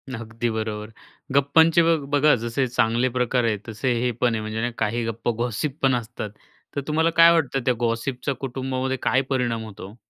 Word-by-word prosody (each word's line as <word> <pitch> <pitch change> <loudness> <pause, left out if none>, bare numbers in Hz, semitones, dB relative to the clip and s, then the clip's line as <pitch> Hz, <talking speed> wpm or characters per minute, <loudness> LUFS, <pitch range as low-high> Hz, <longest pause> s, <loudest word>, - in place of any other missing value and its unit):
अगदी 115 +1 -4
बरोबर, 110 -1 -4 0.5
गप्पांचे 160 +4 +5
बग 165 -3 +2
बघा 145 +1 +4
जसे 120 +3 0
चांगले 120 +1 +1
प्रकार 125 0 0
आहेत 105 -3 0
तसे 115 +3 -2
हे 125 0 +1
पण 120 +1 0
आहे, 110 - -2
म्हणजे 110 +3 -3
काही 115 +2 -1
गप्पा, 115 +1 -2
गॉसिपपण 130 +3 0
असतात 115 -2 -5 0.5
तर 140 - -1
तुम्हाला 160 +2 +2
काय 165 0 +9
वाटतं 140 -5 +1
त्या 125 - +3
गॉसिपच्या 125 +3 -1
कुटुंबामध्ये 130 0 -3
काय 130 - +2
परिणाम 120 -4 -1
होतो? 100 0 -10
125 Hz, 165 wpm, -23 LUFS, 115-135 Hz, 0.5 s, काय